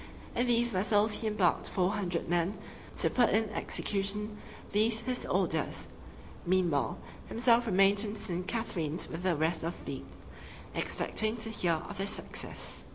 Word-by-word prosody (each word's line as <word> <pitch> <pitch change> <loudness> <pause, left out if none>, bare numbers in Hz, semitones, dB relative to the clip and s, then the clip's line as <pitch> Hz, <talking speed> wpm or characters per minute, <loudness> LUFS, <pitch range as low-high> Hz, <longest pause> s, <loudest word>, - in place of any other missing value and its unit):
In 245 - +2
these 240 0 +3
vessels 210 +2 +3
he 225 - -1
embarked 210 -5 +2
four 185 0 +1
hundred 180 -5 -1
men, 175 +3 +1 0.4
to - - +3
put 245 -2 +4
in 220 0 +2
execution 210 +1 -1 0.3
these 220 +2 +2
his 250 +1 -2
orders. - - 0 0.5
Meanwhile, 170 -9 +2 0.3
himself 235 0 +4
remained 195 +1 +4
in 210 -1 -3
St. 180 -3 -3
Catherine's 175 -9 -2
with 165 - -6
the 180 -2 +2
rest 160 +2 +1
of 170 +1 -3
the - - -13
fleet, - - -5 0.7
expecting 220 +1 -1
to 225 0 -1
hear 180 -6 +1
of 205 -1 -7
their 195 - -1
success. - - -5
205 Hz, 155 wpm, -31 LUFS, 180-220 Hz, 0.7 s, put